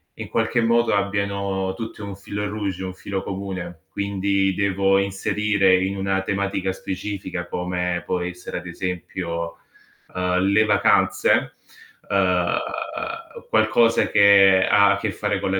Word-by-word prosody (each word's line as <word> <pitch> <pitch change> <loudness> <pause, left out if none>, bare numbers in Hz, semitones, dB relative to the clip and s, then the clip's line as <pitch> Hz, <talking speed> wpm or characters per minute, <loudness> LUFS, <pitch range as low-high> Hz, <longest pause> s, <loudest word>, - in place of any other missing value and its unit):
in - - -7
qualche 115 +1 0
modo 115 +1 +2
abbiano 100 -1 -1
tutte 115 -2 -7
un 100 -1 -7
fil 100 +1 -6
rouge, 100 -3 -3
un 95 -1 -5
filo 95 +1 -5
comune. 95 -4 -6
Quindi 100 -1 0
devo 95 0 +2
inserire 100 0 +2
in 95 +1 -1
una 95 0 -1
tematica 100 -1 -1
specifica, 95 -2 -5
come 90 0 -2
può 90 - -1
essere 90 0 -5
ad 90 - -7
esempio, 85 -1 -4 0.5
uhm, 90 0 0
le 100 +3 +3
vacanze, 100 -2 +2 0.6
uhm, 90 -2 +2 0.9
qualcosa 115 - +3
che 100 -2 +6
ha 100 0 +5
a - - +1
che - - -2
fare - - -1
con - - -2
la 95 - +1
95 Hz, 135 wpm, -22 LUFS, 90-100 Hz, 0.9 s, che